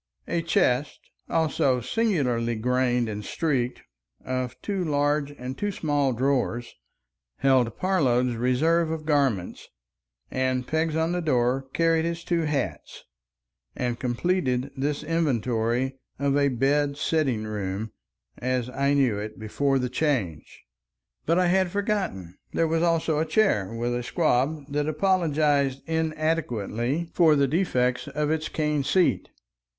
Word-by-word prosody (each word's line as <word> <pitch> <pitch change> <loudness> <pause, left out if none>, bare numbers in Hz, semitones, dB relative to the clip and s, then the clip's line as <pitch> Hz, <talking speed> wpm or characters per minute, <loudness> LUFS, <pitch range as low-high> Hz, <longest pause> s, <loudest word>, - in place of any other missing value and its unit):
A 170 0 0
chest, 145 -4 +1 0.3
also 160 -5 +1
singularly 125 - 0
grained 125 +1 +1
and 105 -1 -5
streaked, 130 - -1 0.4
of 130 -1 -3
two 195 -3 -1
large 145 -1 +1
and 125 +1 -5
two 205 +7 -2
small 145 -6 0
drawers, 125 -1 -1 0.6
held 130 -3 +2
Parload's 125 -10 +1
reserve 155 +8 +2
of 160 -1 -4
garments, 135 - 0 0.6
and 130 -1 0
pegs 160 +1 0
on 160 +1 +1
the 180 0 -1
door 130 -3 +1
carried 165 -1 +2
his 170 0 -3
two 170 -2 0
hats 150 -2 -3 0.7
and 120 -2 -2
completed 130 0 0
this 145 +2 -2
inventory 130 -4 0 0.2
of 140 0 +1
a 140 0 +3
"bed 140 +3 +1
sitting 140 -9 0
room" 105 0 -4 0.5
as 125 -1 -1
I 140 +2 +1
knew 125 -7 +2
it 105 +1 -6
before 135 +6 0
the 125 -1 0
Change. 125 - -2 0.6
But 165 +2 +3
I 180 - +3
had 185 +1 +2
forgotten—there 175 - -2
was 165 0 +1
also 165 -2 +1
a 160 - +1
chair 155 - +2
with 120 +1 -2
a 120 - -1
"squab" 130 +4 +1
that 145 0 0
apologized 150 -5 +1
inadequately 155 -3 -1
for 160 -3 +5
the 140 -1 +3
defects 125 -6 0
of 150 +2 -1
its 155 -1 -1
cane 150 -2 0
seat. 160 +6 +2
140 Hz, 130 wpm, -26 LUFS, 125-160 Hz, 0.7 s, for